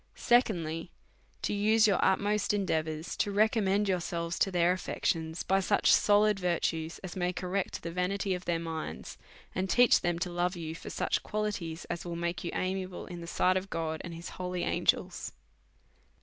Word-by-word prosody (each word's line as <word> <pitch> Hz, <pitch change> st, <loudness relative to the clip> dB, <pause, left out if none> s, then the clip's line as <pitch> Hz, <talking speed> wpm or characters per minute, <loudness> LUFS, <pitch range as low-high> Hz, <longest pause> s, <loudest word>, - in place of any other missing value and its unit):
Secondly/, 175 Hz, -9 st, +1 dB, 0.5 s
To -, -, 0 dB
use 215 Hz, +2 st, +4 dB
your 200 Hz, -4 st, +3 dB
utmost 205 Hz, +2 st, +2 dB
endeavours 160 Hz, -5 st, -1 dB
to -, -, +1 dB
re 205 Hz, +2 st, +4 dB
commend 205 Hz, -2 st, +1 dB
yourselves 170 Hz, -2 st, -2 dB
to -, -, +3 dB
their 175 Hz, -1 st, +3 dB
affections 165 Hz, -2 st, -2 dB
by 195 Hz, +1 st, +2 dB
such 200 Hz, +2 st, +3 dB
solid 210 Hz, 0 st, +4 dB
virtues 165 Hz, -2 st, -1 dB
as 185 Hz, -, -6 dB
may 180 Hz, -1 st, 0 dB
correct 185 Hz, +1 st, -3 dB
the 170 Hz, -, -4 dB
vanity 185 Hz, +2 st, -1 dB
of 180 Hz, 0 st, -5 dB
their 170 Hz, -1 st, +1 dB
minds, 165 Hz, -1 st, -6 dB, 0.3 s
and 185 Hz, +1 st, -2 dB
teach 245 Hz, +2 st, +5 dB
them 175 Hz, -1 st, 0 dB
to 175 Hz, +1 st, -2 dB
love 175 Hz, +1 st, 0 dB
you 160 Hz, -2 st, -5 dB
for 165 Hz, -, -8 dB
such -, -, 0 dB
qualities, 200 Hz, -6 st, -3 dB
as 170 Hz, -, -4 dB
will 175 Hz, -1 st, -5 dB
make 170 Hz, +1 st, -2 dB
you 170 Hz, -, -2 dB
amiable 185 Hz, 0 st, -3 dB
in 175 Hz, -1 st, -8 dB
the 170 Hz, -, -8 dB
sight 185 Hz, +2 st, +2 dB
of 190 Hz, +1 st, -4 dB
God 160 Hz, -2 st, -3 dB
and 170 Hz, -1 st, -7 dB
his 170 Hz, +1 st, -7 dB
holy 180 Hz, -1 st, -4 dB
ang^els. -, -, 0 dB
180 Hz, 180 wpm, -30 LUFS, 170-200 Hz, 0.5 s, teach